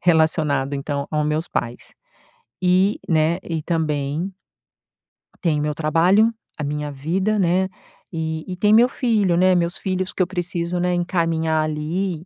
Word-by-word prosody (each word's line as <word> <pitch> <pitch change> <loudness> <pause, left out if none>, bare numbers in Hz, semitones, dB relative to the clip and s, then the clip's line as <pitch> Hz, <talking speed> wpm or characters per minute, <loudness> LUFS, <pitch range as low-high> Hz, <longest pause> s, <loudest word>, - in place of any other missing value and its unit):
relacionado, 155 -4 +2
então, 140 +1 -3
ao 150 -1 0
meus 155 +2 -1
pais. 120 0 -4 0.7
Eh, 185 +3 +4 0.2
né, 160 +2 +2
e 165 -2 -3
também 155 +1 -1 1.1
tem 160 -5 +1
o - - -1
meu 150 0 -1
trabalho, 175 +9 +3 0.2
a 150 - -4
minha 150 0 -3
vida, 185 +10 -1
né, 185 +1 +2 0.4
e 160 -1 -3
e 185 - -4
tem 210 +3 +3
meu 240 +3 +6
filho, 210 -10 +1
né, 185 0 +4
meus 175 +1 0
filhos 185 -1 -2
que - - -2
eu - - -2
preciso, 175 -1 -2
né, 180 0 +1
encaminhar, 165 -3 0
ali, 160 +3 -2
170 Hz, 150 wpm, -22 LUFS, 155-185 Hz, 1.1 s, meu